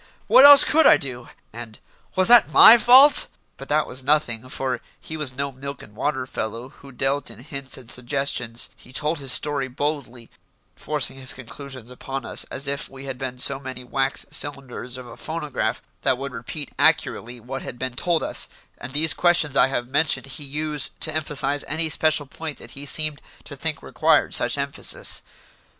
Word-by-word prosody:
"What 270 - +7
else 285 0 +10
could 320 +2 +4
I - - +7
do?" 125 -3 -7 0.2
and 115 -1 -10 0.4
"Was 185 0 +2
that 240 -1 +6
my 225 - +9
fault?" 255 +5 +7 0.3
But 135 - -11
that 150 0 +2
was 130 +1 -4
nothing, 130 -5 0
for 130 -1 -3 0.2
he 160 - -8
was 145 -4 -1
no 140 +1 -3
milk 140 +1 -8
and 105 - -16
water 130 +1 -2
fellow 115 0 -6
who 140 +1 -16
dealt 135 +2 -1
in 115 0 -10
hints 140 -2 -6
and 130 -3 -14
suggestions; 125 -2 -3
he 125 - -17
told 150 +4 -1
his 135 -2 -3
story 145 -2 +2
boldly, 130 -3 -5 0.4
forcing 150 -3 -1
his 130 -1 0
conclusions 130 -1 -9
upon 135 +2 -7
us - - +1
as 140 +1 -2
if 140 0 -3
we 135 0 -11
had 130 -2 -6
been 130 -2 -5
so 135 +2 +2
many 130 -2 -8
wax 135 +2 -2
cylinders 130 -3 -4
of 130 - -9
a 120 -1 -11
phonograph 155 -3 -4 0.2
that 130 - +1
would 140 +1 -6
repeat 125 +5 -6
accurately 120 +1 +1
what 130 +4 -7
had 120 - -8
been 130 0 -3
told 170 +5 0
us, - - 0 0.3
and 125 - -5
these 155 +2 +3
questions 170 -5 +2
I - - +5
have 120 -2 -3
mentioned 145 +4 +1
he 135 +2 -8
used 150 +1 -2
to 155 - 0
emphasise 145 -2 0
any 160 +2 0
special 155 0 0
point 155 +2 -7
that - - -13
he 140 +1 -8
seemed 155 0 0 0.2
to - - -10
think - - -4
required - - +1
such - - +2
emphasis. - - -3
135 Hz, 185 wpm, -22 LUFS, 125-150 Hz, 0.4 s, else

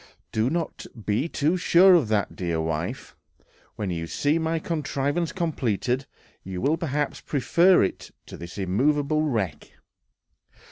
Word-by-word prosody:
"Do 110 +3 +1
not 165 +2 -3 0.2
be 110 +10 0
too 155 +5 +1
sure 180 +1 +6
of 165 -10 +4
that, 105 -2 0
dear 85 -3 -2
wife; 80 -1 -3 0.6
when 100 -3 -3
you 85 -1 -3
see 145 - +1
my 160 0 0
contrivance 155 0 -2
completed, 130 - -1 0.4
you 95 -1 -5
will 145 - +2
perhaps 150 -3 -2
prefer 170 +7 +3
it 95 - -3 0.2
to - - -10
this 85 +2 -9
immovable 140 +10 +1
wreck."... 110 - -2
140 Hz, 135 wpm, -25 LUFS, 100-160 Hz, 0.6 s, sure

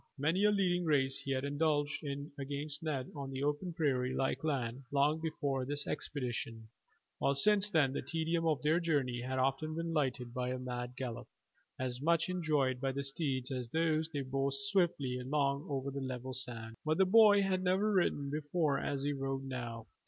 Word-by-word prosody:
Many 165 +8 +2
a 210 - +5
leading 180 -3 +2
race 135 -4 +2
he - - -7
had 135 0 0
indulged 145 0 0
in 140 0 -5
against 145 +2 -4
Ned 140 -5 -3
on 140 -2 -5
the 135 0 -4
open 150 +5 -1
prairie 130 -6 0
like 135 - -1
land 130 -5 -1
long 145 +3 +3
before 145 -4 -1
this 145 +2 -2
expedition, 115 -5 -3 0.5
while 140 - +2
since 205 +7 +5
then 145 -8 +3
the - - -2
tedium 165 0 -1
of 155 -3 +1
their 155 +3 +3
journey 140 -8 0
had 130 +1 -3
often 135 +4 0
been 165 0 -2
lightened 130 -5 -1
by 125 0 -2
a 130 - -2
mad 125 -1 -5
gallop, 125 -3 -5 0.5
as 125 0 -3
much 165 +2 +2
enjoyed 150 -8 +1
by 135 -1 0
the 140 +1 -3
steeds 135 -2 -2
as 125 -3 -3
by 160 - -3
those 160 -1 +1
they 145 -3 -3
bore 135 +1 -1
swiftly 165 -7 +1
along 140 +2 0
over 140 -1 -2
the 140 0 -4
level 130 0 -4
sands; 115 -3 -4
but 155 +1 +1
the 190 - +5
boy 205 0 +7
had 190 -1 +1
never 190 +3 +2
ridden 145 -7 +1
before 150 0 0
as 140 -1 -2
he 145 0 0
rode 135 -1 -3
now. 120 -4 -5
140 Hz, 190 wpm, -34 LUFS, 130-160 Hz, 0.5 s, boy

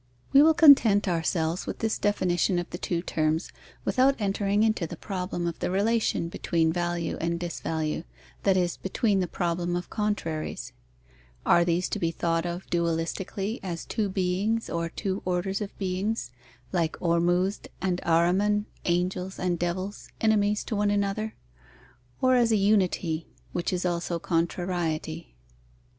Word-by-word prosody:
We 275 - +9
will 320 +1 +6
content 240 -11 +7
ourselves 165 -1 0
with - - -3
this 225 -1 -1
definition 185 -3 +1
of 175 - -2
the 175 - -5
two 170 -1 -2
terms, 160 -1 0 0.3
without 265 +1 +3
entering 205 0 +1
into 215 -6 +1
the 170 - -8
problem 180 -2 -3
of 170 -1 -3
the - - -1
relation 205 -2 +1
between 165 -1 0
value 175 -1 -1
and 170 +1 -1
disvalue, 160 -2 -2 0.4
that 195 -2 +3
is, 175 -2 0
between 200 +1 0
the 180 - 0
problem 175 0 -1
of 175 - -4
contraries. 205 -8 -2 0.7
(Are 170 - +5
these 170 +1 +1
to - - -2
be 165 - +1
thought 165 +1 -1
of 175 +2 -5
dualistically, 170 +5 -1
as 175 -3 -5
two 210 -3 -1
beings 195 +4 0
or 170 0 -1
two 195 +3 -3
orders 185 +3 -1
of 205 - -6
beings, 195 - -2 0.4
like 170 -4 0
Ormuzd 175 +3 +1
and 180 -2 -1
Ahriman, 185 +5 +3 0.2
angels 180 +2 -1
and 175 -2 -1
devils, 185 +4 -3
enemies 210 -1 +2
to 220 - -3
one 205 0 +2
another; 205 +2 -1 0.9
or 255 0 +5
as 240 -2 +3
a - - +4
unity, 185 -5 +1 0.2
which 175 - -2
is 180 0 -1
also 170 -1 -1
contrariety?) 165 - -2
180 Hz, 150 wpm, -27 LUFS, 170-205 Hz, 0.9 s, We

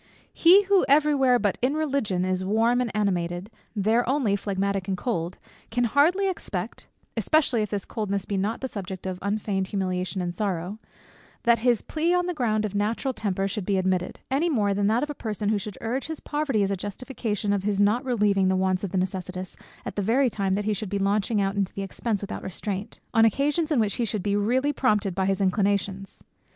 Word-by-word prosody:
He 370 +5 +7
who 395 -1 +4
every 300 +1 +5
where 260 -3 +4
but 205 -4 0
in 260 +4 +2
Religion 270 -12 0
is 185 0 -1
warm 225 +5 +2
and 245 - -1
animated, 180 -1 -1 0.2
there 220 +4 +2
only 260 -7 +2
phlegmatic 200 -1 -1
and 190 -1 -1
cold, 180 -5 -2 0.3
can 245 +2 0
hardly 320 - +3
expect 375 - -4 0.3
(especially 285 -7 +2
if 210 - -2
this 200 -2 -3
coldness 200 -3 -2
be 200 - -3
not 205 +4 -1
the 265 - -2
subject 190 -5 -6
of 185 -1 -3
unfeigned 200 -1 -1
humiliation 185 -1 -2
and 175 -1 -2
sorrow) 190 +1 -3 0.6
that 235 -2 +4
his 240 -1 +2
plea 330 +3 0
on 355 0 +1
the 360 - -1
ground 220 -7 0
of 205 - -4
natural 220 +6 0
temper 195 -4 -1
should 200 +1 -3
be 195 +1 0
admitted; 185 -1 -1
any 300 +6 +2
more 210 -9 +2
than 200 0 +1
that 225 +5 +2
of 295 - -2
a - - -4
person 215 -5 -3
who 215 -1 +2
should 205 0 -7
urge 250 +5 -2
his 320 -1 -5
poverty 295 -8 0
as 195 - 0
a - - +1
justification 205 0 -3
of 200 - 0
his 200 0 -1
not 210 +5 +3
relieving 205 -6 +2
the 190 - +2
wants 185 0 +1
of 200 - -2
the 190 - -1
necessitous, 185 0 -3 0.3
at - - -5
the 205 - 0
very 240 +5 +2
time 195 -2 -1
that 205 +1 -1
he 215 - +1
should 205 0 -4
be 200 - -1
launching 200 +2 +1
out 195 0 0
into 200 -1 -2
expence 200 +2 -2
without 200 - -5
restraint, 200 +3 -5
on 225 - +5
occasions 290 - +2
in 285 - +3
which 210 -3 +1
he 240 - +1
should 215 -3 -2
be 205 -1 +1
really 255 +8 +1
prompted 210 -8 +1
by 190 +1 0
his 195 0 +1
inclinations. 195 0 0
205 Hz, 210 wpm, -26 LUFS, 195-245 Hz, 0.6 s, He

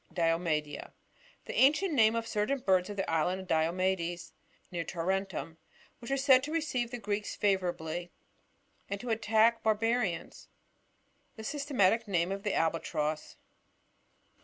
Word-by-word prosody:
Diomedea. 165 -3 -1 0.2
— - - -30
The - - -6
afnrient 310 +8 +4
name 225 -5 +4
of 230 0 -1
certain 215 +5 0
birds 190 -6 +2
of 205 - -6
the 195 - -1
island 165 +3 +1
of 190 - -11
Diomedcs, 175 +1 0 0.4
near 170 -2 -2
Tarentum, 185 -1 -3 0.4
which 235 - -9
were 275 - +1
said 265 -1 +5
to 290 +3 -5
receive 295 -7 -1
the 245 - -5
Greeks 205 -1 -3
favourably, 175 -3 -1 0.8
and 200 0 -3
to 240 +1 -4
attack 225 +1 +3
the - - -36
bar 220 -1 +4
barians. 225 -5 -2 0.9
The 220 - -9
systematic 235 -5 +1
name 175 -2 +1
of 195 0 -3
the 205 -1 -1
Albatross. 155 -2 -1
195 Hz, 145 wpm, -31 LUFS, 170-230 Hz, 0.9 s, said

